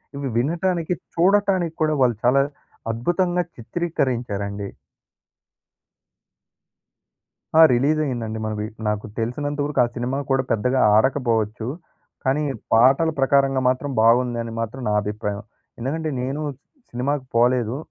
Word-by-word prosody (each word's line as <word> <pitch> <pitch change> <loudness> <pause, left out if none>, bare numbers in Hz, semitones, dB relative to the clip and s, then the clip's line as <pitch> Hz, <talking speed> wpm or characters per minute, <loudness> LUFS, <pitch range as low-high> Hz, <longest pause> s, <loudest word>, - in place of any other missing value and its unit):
ఇవి 140 -2 -3
వినటానికి, 170 +5 0 0.2
చూడటానికి 185 -2 +2
కూడా 155 -1 +2
వాళ్ళు 120 -3 +3
చాలా 130 +3 +4 0.5
అద్భుతంగా 175 +9 0
చిత్రీకరించారండి. 115 - -3 2.9
ఆ! - - +8
రిలీజ్ 145 +6 +2
అయిందండి. 115 -4 -3
మనవి 105 -1 -3 0.2
నాకు 105 0 -1
తెలిసినంత 145 +6 -3
వరకు 150 - -2
ఆ - - +3
సినిమా 125 +3 -2
కూడా 135 0 +2
పెద్దగా 125 +4 +1 0.2
ఆడకపోవచ్చు. 115 -2 +1 0.6
కానీ, 135 +3 +1 0.3
పాటల 135 +8 +5
ప్రకారంగా 135 0 +3
మాత్రం 135 +2 -2
బాగుందని 115 0 +2
మాత్రం 125 +4 -5
నా 105 - +1
అభిప్రాయం. 105 -1 -4 0.4
ఎందుకంటే 155 +6 -2
నేను 135 +4 -3 0.5
సినిమాకి 130 +3 -2
పోలేదు. 120 0 +2
130 Hz, 105 wpm, -22 LUFS, 115-150 Hz, 2.9 s, ఆ